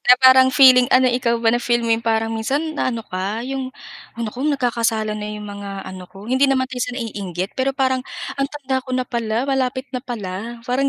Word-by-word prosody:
na 250 - +7
parang 260 0 +7
feeling 255 -2 +7
ano, 255 0 +5
ikaw 245 -1 +2
ba 225 - +5
na 240 - +1
feel 240 -1 +1
mo 230 - +2
yung 225 - +1
parang 225 0 0
minsan 280 +8 -1
na 300 - -1
ano 230 -3 -4
ka, 195 +5 -3
yung, 265 0 -3 0.5
ay 235 - -3
nako, 250 +7 -2
nagkakasalan 230 -5 0
na 210 0 -5
yung 210 - -8
mga 200 -1 -7
ano 185 -1 -9
ko, 195 +2 -13
hindi 260 +4 +2
naman 265 -1 +2
tayo 255 -1 -6
sa 245 0 -2
naiinggit 200 -6 -4
pero 270 +1 -1
parang 260 -1 +1 0.4
ang 275 - +1
tanda 270 -3 -2
ko 255 0 -4
na 255 - 0
pala 235 -1 -2
malapit 260 -1 -1
na 255 - -2
pala, 230 -2 -6
parang 260 +3 +1
245 Hz, 220 wpm, -20 LUFS, 220-260 Hz, 0.5 s, na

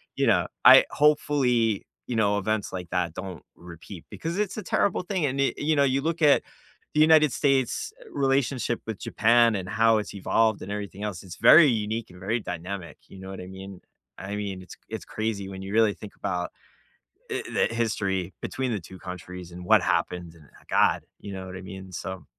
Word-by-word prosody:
you - - +1
know, - - +3 0.2
I - - +9
hopefully, 130 -7 +2 0.2
you 125 - -3
know, 105 -2 +2
events 110 +1 -1
like 90 -2 -6
that 90 -3 -1
don't 90 -3 -7
repeat, 85 +1 -11
because 170 +3 -4
it's 210 -1 -1
a 215 - -4
terrible 200 - +1
thing, 180 -3 -1
and, 135 0 -1
i 135 - +2
you 155 +1 +1
know, 140 - +4
you 135 0 +2
look 165 +3 -2
at 150 -2 +5 0.5
the 150 - +3
United 155 -2 +6
States' 135 - +1 0.2
relationship 135 -3 0
with 110 -3 -4
Japan, 115 0 +3
and 95 -2 -4
how 115 +1 +4
it's 105 - -4
evolved, 110 +2 +1
and 100 - -6
everything 100 -1 -5
else, 100 -5 -4
it's 90 -3 -9
very 155 +8 +8
unique, 110 -2 -1
and 90 - -14
very 105 +5 -1
dynamic, 90 -3 -6
you 95 - -13
know 95 0 -9
what 95 - -7
I 90 - -9
mean? 95 0 -10 0.4
I 100 +2 -5
mean, 100 -2 -4
it's 90 - -12
it's - - -6
crazy 110 -3 -3
when 95 -1 -8
you 95 +1 -7
really 110 -2 +4
think 105 - -11
about 90 -1 -2 0.8
i - - -2
the - - +3
history 100 -5 -1
between 130 -2 -3
the 105 - -1
2 95 +2 -12
countries, 90 -1 -8
and 90 +1 -9
what - - +5
happened, 85 -2 -1
and 75 -3 -18 0.2
god, - - +3 0.2
you 100 - -8
know 95 -1 -6
what 95 0 -7
I - - -8
mean? 95 0 -9
So. 95 +1 -6
105 Hz, 200 wpm, -26 LUFS, 95-125 Hz, 0.8 s, I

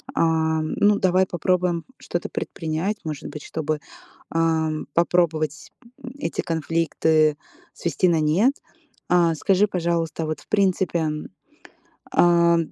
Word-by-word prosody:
А, 160 -1 +2
ну, 205 +6 +2
давай 185 0 +3
попробуем 180 -1 0
что-то 175 - -4
предпринять, 165 +6 -3
может 155 -3 -5
быть, 150 - -8
чтобы, 155 -1 -3 0.5
ам, 160 -1 0
попробовать, 165 -3 +1 0.3
м, 250 - -7
эти - - -4
конфликты 160 -1 +1 0.4
свести 170 +2 0
на 165 - +2
нет. 190 - +3 0.6
А, 170 -2 +3
скажи, 195 +5 +2
пожалуйста, 170 -4 -1
вот, 155 -1 -3
в - - -21
принципе, 185 -5 +1 1.0
а, 170 -1 +4
165 Hz, 115 wpm, -23 LUFS, 160-180 Hz, 1.0 s, а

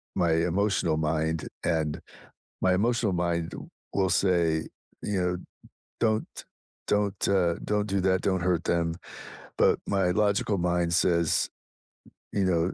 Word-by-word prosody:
my 85 -3 +2
emotional 90 +1 +1
mind, 80 0 -1 0.2
and 80 -3 0 0.6
my 95 0 +3
emotional 115 +1 +1
mind 85 -2 -1 0.4
will 95 -1 +2
say, 85 -3 +2 0.4
you 100 -3 -1
know, 90 0 0 0.6
"Don't 110 -1 +1 0.6
don't, 105 -1 0
uh 90 -4 +2
don't 105 0 0
do 100 -1 0
that, 95 0 +2
don't 95 -2 0
hurt 85 -2 +1
them." 85 -1 0 0.6
But - - +4
my 95 -2 +1
logical 100 +1 +1
mind 85 -1 +1
says, 85 -2 +2 0.9
you 100 - +1
know, 90 -1 +1
90 Hz, 125 wpm, -27 LUFS, 85-100 Hz, 0.9 s, But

